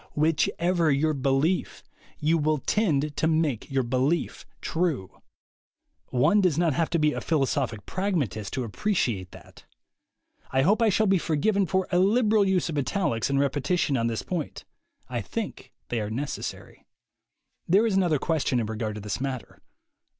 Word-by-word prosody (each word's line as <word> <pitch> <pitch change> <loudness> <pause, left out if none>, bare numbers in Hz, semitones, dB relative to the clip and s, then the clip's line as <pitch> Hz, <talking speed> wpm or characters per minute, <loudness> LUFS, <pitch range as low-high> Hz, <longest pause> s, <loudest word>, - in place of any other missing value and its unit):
Whichever 165 +2 +1
your 155 +2 +2
belief, 140 +6 0 0.3
you 160 +2 +2
will 155 +1 +1
tend 150 -4 0
to 160 - +1
make 155 -7 0
your 135 -1 +1
belief 130 +7 -1
true. 160 - -2 0.9
One 155 +12 +3
does 180 -6 +2
not 170 -3 +2
have 165 +4 0
to 170 - +1
be 150 -1 +2
a - - -4
philosophic 135 -8 -1
pragmatist 145 - -2
to 125 -3 -2
appre 210 - -1
ciate 95 - -1
that. - - -15 0.8
I 130 0 +2
hope 205 - +3
I 225 - +5
shall 215 +2 +2
be 195 -2 +3
forgiven 190 +6 +1
for 190 +3 0
a 180 - +3
liberal 215 +2 +4
use 190 -2 +1
of 155 -3 -2
italics 135 - -1
and 140 0 +1
repetition 140 +2 +1
on 115 -2 +1
this 115 -1 -2
point: 170 -5 -4 0.4
I - - -3
think - - -6 0.2
they 120 -2 -1
are 105 - -3
necessary. 135 +6 -6 0.8
There 195 +6 +4
is 215 -4 +1
another 175 -5 +3
question 145 -4 0
in 115 - -1
regard 110 0 -3
to 105 - -6
this 105 +3 -4
matter. 135 -3 -5
155 Hz, 165 wpm, -26 LUFS, 130-180 Hz, 0.9 s, I